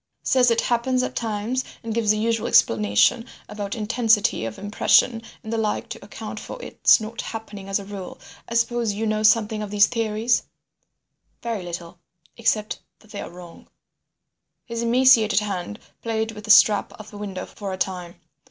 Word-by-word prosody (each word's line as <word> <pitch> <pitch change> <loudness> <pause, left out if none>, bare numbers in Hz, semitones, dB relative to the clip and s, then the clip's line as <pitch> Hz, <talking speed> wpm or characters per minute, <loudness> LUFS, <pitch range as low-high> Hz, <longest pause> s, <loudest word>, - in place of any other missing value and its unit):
"Says 250 -2 +4
it 230 0 +2
happens 250 +2 +1
at - - -4
times 225 +3 -2 0.2
and 225 -1 -4
gives 225 -2 0
the 215 - +4
usual 225 +1 0
explanation 105 - +3 0.2
about 205 0 -5
intensity 220 - +1
of 115 -1 -6
impression 215 +3 +2 0.2
and 220 0 -5
the 225 - 0
like 215 -1 -2
to - - -8
account - - -8
for - - -8
its 485 - +3
not 220 +1 -6
happening 210 -3 -8
as 195 - +1
a 200 - -7
rule. 195 -2 -8 0.3
I 235 - -4
suppose 235 -2 +1
you 215 +2 -3
know 215 0 0
something 215 0 +3
of 210 - -5
these 205 0 +5
theories—" 225 0 0 1.0
"Very 230 -4 -3
little—except 175 +4 -4 0.2
that 215 - -21
they 205 - -6
are - - -7
wrong." 175 -1 -13 1.0
His 230 -1 -4
emaciated 230 -4 +4
hand 200 0 -4 0.2
played 225 -1 -2
with 210 -1 -10
the - - -11
strap 210 -1 +5
of 215 0 -12
the 205 - -10
window 195 -3 -5
for 200 -2 -7
a 185 - -4
time. 180 -2 -3
215 Hz, 170 wpm, -23 LUFS, 200-230 Hz, 1.0 s, these